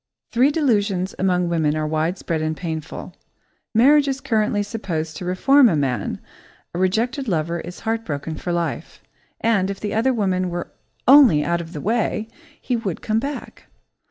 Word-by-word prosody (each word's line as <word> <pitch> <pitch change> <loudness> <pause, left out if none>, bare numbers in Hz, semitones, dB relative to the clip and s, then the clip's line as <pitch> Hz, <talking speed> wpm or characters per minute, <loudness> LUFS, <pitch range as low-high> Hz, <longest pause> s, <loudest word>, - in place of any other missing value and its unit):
Three 250 +4 +4
delusions 205 - +1
among 180 -2 +1
women 160 -3 +1
are 155 - -1
widespread 160 +1 -1
and 155 0 -2
painful. 160 -3 -6 0.6
Marriage 285 +5 +5
is 270 -1 -1
currently 215 -5 0
supposed 170 -7 -4
to 180 - -6
reform 250 +9 +5
a 170 - +1
man, 135 -4 -1 0.5
a 175 - -3
rejected 235 +9 0
lover 170 -2 -1
is 175 +2 -9
heartbroken 165 -10 -3
for 175 - -4
life, 170 -1 -3 0.4
and, 200 -4 +2
if 200 - -4
"the 210 - -3
other 230 +5 +2
woman" 190 -6 0
were 175 0 -5 0.4
only 250 - +7
out 170 0 0
of 165 0 -10
the 150 - -5
way, 220 0 0 0.3
he 250 - -1
would 205 -7 -4
come 220 0 +1
back. 280 +4 -6
190 Hz, 160 wpm, -22 LUFS, 165-230 Hz, 0.6 s, only